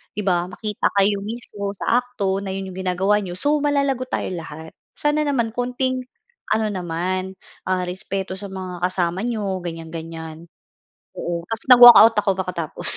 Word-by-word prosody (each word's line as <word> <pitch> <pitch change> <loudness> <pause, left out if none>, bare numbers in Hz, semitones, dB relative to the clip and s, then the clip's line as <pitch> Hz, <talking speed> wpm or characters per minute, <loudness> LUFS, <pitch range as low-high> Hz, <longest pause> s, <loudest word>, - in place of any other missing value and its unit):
'di 210 - -3
ba, 180 -2 +1
makita 210 +3 -2
kayo 200 0 +3
mismo 205 -1 -5
sa 235 +5 +2
akto 200 -6 -2
na 195 -1 -6
'yon 190 -1 -5
'yong 185 - -8
ginagawa 190 +3 +1
niyo, 180 -3 -6
so 290 +8 +1
malalagot 280 -3 0
tayo - - -3
lahat. 160 -2 -8 0.2
Sana 295 0 0
naman 235 -6 0
konting 250 +2 -2 0.5
ano 220 -1 0
naman, 185 +1 -3 0.3
ah, 185 -1 0
respeto 190 +1 -4
sa 200 - -6
mga 185 -2 -7
kasama 180 -1 -1
niyo.” 205 -5 -2
Ganiyan-ganiyan. 165 -1 -8 0.7
Oo, 170 0 -4
tapos 225 -1 -2
nag-walkout 240 -2 +10
ako 205 -1 +2
makatapos. 170 -4 -4
195 Hz, 155 wpm, -21 LUFS, 180-230 Hz, 0.7 s, nag-walkout